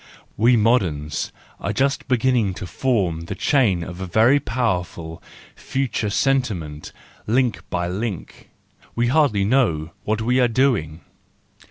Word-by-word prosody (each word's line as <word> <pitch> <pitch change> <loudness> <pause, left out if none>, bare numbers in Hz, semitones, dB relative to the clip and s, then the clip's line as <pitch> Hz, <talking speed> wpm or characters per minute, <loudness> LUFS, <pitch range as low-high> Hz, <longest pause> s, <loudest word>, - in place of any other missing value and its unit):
We 120 +3 +4
moderns 90 - 0 0.3
are - - -2
just 140 +1 0
beginning 120 -6 +1
to 95 - -6
form 90 -7 -1
the 95 - -5
chain 100 -9 +2
of 90 +2 -8
a 95 - -4
very 115 +10 +4
powerful, 90 -10 -3 0.3
future 130 -5 -2
senti¬ 130 -1 +1
ment, 75 -2 -9 0.4
link 120 +1 +1
by 85 -1 -1
link,—we 105 +4 -5
hardly 135 -8 +3
know 90 - +1
what 110 +1 -1
we 125 +3 +2
are 125 - +4
doing. 115 - 0
110 Hz, 130 wpm, -22 LUFS, 90-125 Hz, 0.4 s, We